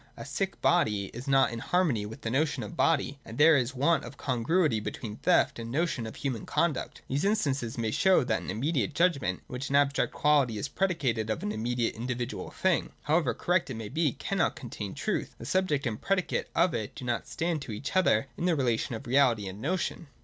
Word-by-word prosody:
A - - -7
sick - - -3
body 100 -2 +2
is 125 +4 -8
not 135 -2 +4
in 115 - -5
harmony 135 - +1
with 110 - -10
the 115 - -3
notion 150 +4 0
of 170 - -8
body, 140 -4 +1
and 110 - -9
there 155 +2 +7
is 130 -1 +1
a - - -11
'want 160 +5 +3
of 140 - -9
congruity 135 +1 +1
between 105 0 -6
theft 180 -8 +2
and 115 0 -6
the 135 - -2
notion 160 -9 0
of 110 - -8
human 130 -6 -3
conduct. 170 -6 -1
These 140 +3 -1
instances 140 - 0
may 115 -2 -1
show 180 +2 +4
that 115 -3 0
an - - -7
immediate 125 - -1
judgment, 140 - +1
in - - -33
which 125 +2 -4
an 140 - 0
abstract 140 0 +3
quality 140 -7 +2
is 105 - -3
pre 195 - +1
dicated 120 - -1
of 110 - -2
an 105 - -1
immediately 115 +2 -1
individual 125 0 -3
thing, 185 -3 0
however 150 -6 +2
correct 175 -4 +1
it 130 - -4
may 110 -2 -6
be, 155 -1 +1
cannot 195 -3 -1
contain 105 -5 -6
truth. - - -2
The - - -9
subject 150 -2 +1
and 110 -3 -3
predicate 195 -2 0
of 180 - +3
it 105 -7 -4
do 130 - -7
not 120 -1 -2
stand 165 -2 -2
to 125 - -7
each 110 - -5
other 185 -6 +4
in 175 - -2
the 175 -2 +3
relation 120 -4 0
of 110 - -8
reality 120 -5 +3
and 95 +3 -7
notion. 175 +1 -2
135 Hz, 220 wpm, -29 LUFS, 115-160 Hz, -, there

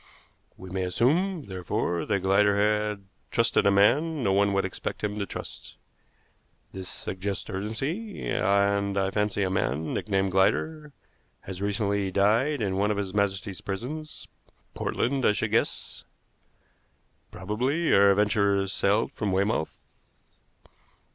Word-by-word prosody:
We 95 -1 -10
may 95 0 -2
assume, 155 - +1
therefore, 90 -3 -2
that 100 -3 0
Glider 100 +2 +3
had 105 -1 0 0.2
trusted - - +2
a - - +7
man 140 +10 +3
no 95 - +2
one 100 +1 +3
would 100 -1 +1
expect 95 - -5
him 105 0 -2
to 100 - -2
trust. - - -8 1.0
This 95 -1 -7
suggests 95 +1 -4
urgency, 135 - -4
and 100 +1 +1
I 95 0 +1
fancy 105 0 0
a 95 - -1
man, 80 -4 -1
nicknamed 95 -2 0
Glider, 150 - +1 0.5
has 95 0 -7
recently 100 -1 0
died 110 +9 +2
in 95 -3 -1
one 100 +2 +2
of 105 - 0
His 100 -2 -3
Majesty's 100 -2 -1
prisons 140 +11 -6 0.5
Portland 135 +2 -1
I 105 - +4
should 110 +1 -2
guess. 115 - -1 1.3
Probably 125 - -1
our 100 0 +6
adventurers 100 -1 +2
sailed 105 +3 +1
from 105 -2 -2
Weymouth. 95 -3 0
100 Hz, 130 wpm, -27 LUFS, 95-110 Hz, 1.3 s, a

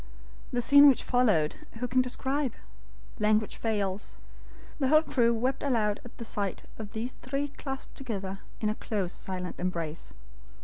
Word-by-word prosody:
The 245 -1 0
scene 285 +3 +9
which 265 - +2
followed, 210 -12 +2 0.2
who 245 +2 -3
can 255 +1 +3
describe? 265 +1 -1 0.7
Language 215 0 +2
fails. 205 -3 -2 0.6
The 270 - +2
whole 310 +3 +6
crew 235 -6 +3
wept 250 +3 0
aloud 220 -7 +1
at 245 - -13
the 230 - -6
sight 200 -4 -3 0.2
of 215 -1 -7
these 230 +3 -3
three 275 +3 -3
clasped 270 -1 -7
together 195 -7 -4 0.2
in 215 - +1
a - - +1
close, 200 -5 -2
silent 180 -1 -3
embrace. 170 -3 -3
225 Hz, 150 wpm, -29 LUFS, 200-260 Hz, 0.7 s, scene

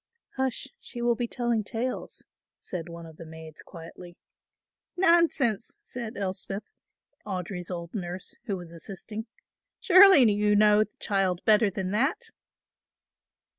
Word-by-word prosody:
"Hush, 265 0 -2
she 240 - -9
will 240 0 +3
be 240 +1 -2
telling 235 -3 -1
tales," 230 +5 -4 0.3
said 175 -2 -7
one 170 0 -9
of 160 -1 -13
the - - -9
maids 160 -1 -11
quietly. 175 +1 -12 0.8
"Nonsense," 335 - +3
said 235 -2 -7
Elspeth, 195 +1 -3 0.6
Audry's 180 -2 -5
old 170 -2 -6
nurse, 180 -2 -6
who 200 -5 -2
was 175 -2 -10
assisting, 210 +6 -7 0.5
"surely 375 -5 +8
you 210 0 +2
know 210 0 +5
the 215 - -16
child 190 -3 0
better 215 -1 +5
than 190 0 -4
that." 265 - 0
205 Hz, 130 wpm, -27 LUFS, 180-235 Hz, 0.8 s, surely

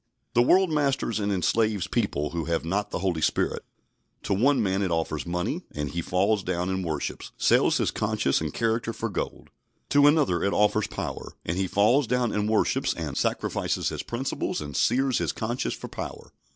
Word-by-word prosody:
The 120 - +5
world 185 +7 +4
masters 140 -6 0
and 100 0 0
enslaves 105 +1 +1
people 95 -10 -1
who 85 -1 -3
have 85 -1 -1
not 100 +5 -1
the - - -3
Holy 85 -4 0
Spirit. - - 0 0.6
To - - 0
one 130 +7 +3
man 95 0 0
it 95 - 0
offers 80 -1 -2
money, 90 +1 -2
and 75 -1 -3
he 85 - -2
falls 100 +5 +1
down 90 0 -1
and 95 0 -1
worships; 80 -4 -4
sells - - +4
his - - +1
conscience 70 - 0
and 80 -2 -2
character 115 +2 -1
for 115 - -3
gold. 100 - -5 0.4
To 145 0 +6
another 145 - +3
it 100 - +1
offers 105 0 +2
power, - - -5
and 85 - -1
he 95 +1 0
falls 115 +8 +3
down 125 -1 +1
and 105 0 0
worships 110 - +1
and - - -4
sacrifices - - -1
his - - -4
principles 125 +3 -3
and 75 -2 -6
sears 130 +1 +2
his - - 0
conscience 120 +3 -2
for - - -8
power. - - -7
100 Hz, 190 wpm, -26 LUFS, 85-120 Hz, 0.6 s, To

